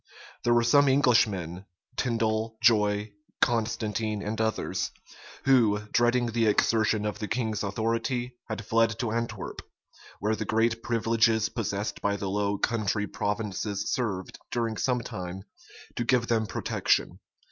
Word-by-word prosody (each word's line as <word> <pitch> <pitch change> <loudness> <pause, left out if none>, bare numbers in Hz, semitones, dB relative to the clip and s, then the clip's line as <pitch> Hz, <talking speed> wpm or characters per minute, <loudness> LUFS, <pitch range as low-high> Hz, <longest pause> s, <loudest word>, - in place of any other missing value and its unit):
There 120 0 +3
were 120 - +4
some 140 +4 +5
Englishmen, 110 - +2 0.3
Tindal, 110 -2 0
Joye, 105 -2 +3 0.3
Constantine, 110 -2 0
and 110 +2 -2
others, 110 0 -1 0.6
who, 120 -6 +5
dreading 120 0 +2
the 115 -1 +2
exertion 110 0 +2
of 105 0 -3
the 105 - -3
king's 110 -3 -1
authority 115 +4 -1
had 110 -1 -4
fled 115 0 +2
to 115 -2 -2
Antwerp;[*] 115 -3 -3 0.6
where 110 +2 +1
the 110 - -3
great 115 +2 +1
privileges 115 -1 +2
possessed 105 -3 -3
by 100 0 +1
the 100 -1 -3
Low 100 0 0
Country 105 -1 0
provinces 105 0 -2
served, 100 -8 -3
during 115 -2 -1
some 125 +3 0
time, 95 -5 -6 0.5
to - - 0
give 120 0 +2
them 110 -2 +1
protection. - - 0
110 Hz, 135 wpm, -28 LUFS, 105-115 Hz, 0.6 s, some